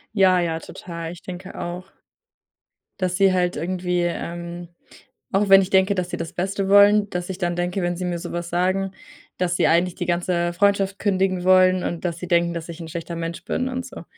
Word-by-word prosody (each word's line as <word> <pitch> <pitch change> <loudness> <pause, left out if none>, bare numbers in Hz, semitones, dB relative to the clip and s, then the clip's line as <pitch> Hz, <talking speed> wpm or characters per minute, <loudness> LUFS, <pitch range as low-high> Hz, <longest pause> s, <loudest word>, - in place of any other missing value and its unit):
Ja, 190 -3 +5
ja, 165 -2 -1
total. 170 -1 -7
Ich 175 - -11
denke 185 +1 -8
auch, 180 +2 -6 1.1
dass 185 -2 -1
sie 195 0 +4
halt 180 -1 +1
irgendwie, 180 +2 -1
ähm, 175 0 -4 0.6
auch 200 +1 +2
wenn 195 0 +8
ich 185 - -4
denke, 190 +1 +4
dass 180 -2 -2
sie 175 - -3
das 165 -1 -5
Beste 195 +2 -2
wollen, 205 +1 +6
dass 180 0 -4
ich 190 -1 -5
dann 175 -2 -1
denke, 180 +2 -1
wenn 175 0 -1
sie 180 - -4
mir 175 -1 -2
sowas 175 0 -5
sagen, 185 +2 0 0.5
dass 180 -1 0
sie - - +3
„eigentlich 175 +2 +2
die 175 - -3
ganze 175 0 0
Freundschaft 200 +1 +1
kündigen 190 -2 0
wollen“ 185 0 +5
und 170 0 -4
dass 170 -2 -2
sie 180 - -7
denken, 170 -1 +2
dass 165 0 -6
ich 170 +1 -8
„'n 165 - -7
schlechter 170 +1 -6
Mensch 165 0 -5
bin“ 255 +1 -1
und 255 0 -4
so. - - -10
180 Hz, 205 wpm, -23 LUFS, 175-190 Hz, 1.1 s, wenn